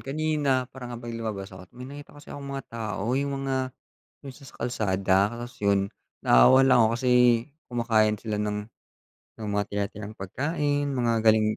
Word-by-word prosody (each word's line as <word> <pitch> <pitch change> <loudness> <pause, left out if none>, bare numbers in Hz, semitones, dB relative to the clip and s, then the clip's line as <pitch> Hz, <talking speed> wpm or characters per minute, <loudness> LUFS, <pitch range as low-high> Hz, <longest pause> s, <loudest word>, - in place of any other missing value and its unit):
kanina 145 -2 0
parang 125 -2 -8
nga 120 - -6
bang 120 -1 -6
lumabas 100 -4 -5
ako 95 - -12
may 125 +1 -8
nakita 145 +1 -10
kasi 145 - -15
akong 140 -1 -7
mga 135 -3 -5
tao 110 -3 -4
yung 140 0 -1
mga 130 -1 -1 0.5
yung 130 - -8
sa 140 - -16
sa - - -14
kalsada 95 -5 +1 0.2
tapos 120 +1 -7
yun 100 -1 +3 0.3
naawa 130 - +6
lang 125 -3 +6
ako 115 +1 +2
kasi 125 0 +1 0.6
kumakain 110 -3 +2
sila 110 -1 -4
ng 105 0 -3 0.7
ng 110 -2 -6
mga 100 0 +1
tira-tirang 105 +1 -4
pagkain, 145 - -1
mga 120 -2 +1
galing 110 0 +4
115 Hz, 170 wpm, -26 LUFS, 105-135 Hz, 0.7 s, naawa